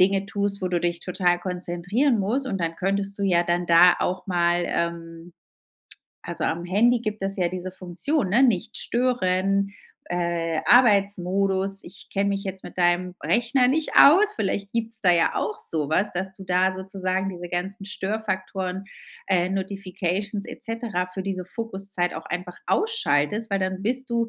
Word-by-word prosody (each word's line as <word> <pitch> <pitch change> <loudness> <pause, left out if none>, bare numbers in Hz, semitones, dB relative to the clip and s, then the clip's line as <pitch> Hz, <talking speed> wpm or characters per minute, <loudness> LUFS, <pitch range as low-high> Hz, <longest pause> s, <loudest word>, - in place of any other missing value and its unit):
Dinge 195 +1 +3
tust, 200 0 -1
wo 185 - -1
du 175 -1 0
dich 175 0 0
total 180 -1 +1
konzentrieren 180 +8 0
musst. 240 +8 0
Und 195 -3 -2
dann 165 0 -1
könntest 195 +1 -1
du - - -3
ja 175 -3 +3
dann 175 +1 0
da 170 +1 +7
auch 185 0 -2
mal 175 -1 +2
ähm, 170 0 -4 0.9
also - - -4
am 170 +1 -1
Handy 230 +7 +3
gibt 215 -3 -4
es 195 +1 -2
ja 180 -2 +1
diese 185 +1 -5
Funktion, 190 - -2
ne, 235 +8 +4
„nicht 225 -3 +2
stören“, 195 -5 +1 0.4
äh, 170 -2 -1
Arbeitsmodus, 195 -4 +3
ich 185 +2 -13
kenn 200 0 +1
mich 200 0 -1
jetzt 190 -1 -6
mit - - -10
deinem 175 0 +1
Rechner 245 +2 +2
nicht 310 +3 0
aus. 405 +8 +7
Vielleicht 200 0 -2
gibt's 225 -1 -3
da 180 -4 +5
ja 170 -1 +2
auch - - -2
so 155 -3 -2
was, 190 +7 +1
dass 190 +1 -4
du 195 - -10
da 185 +1 +2
sozusagen 190 0 -2
diese 175 -1 -7
ganzen 190 +3 -4
Störfaktoren, 190 -2 -3 0.4
äh, 180 -2 +2
Notifications 195 +1 -3
et 245 - -10
cetera 225 -6 -2
für 185 +1 -6
diese 185 -2 -3
Fokuszeit 195 -3 -3
auch - - -7
einfach 180 0 -5
ausschaltest, 230 - +1
weil 195 -1 0
dann 185 0 -2
bist 250 +3 -1
du 235 -1 0
190 Hz, 170 wpm, -24 LUFS, 180-210 Hz, 0.9 s, da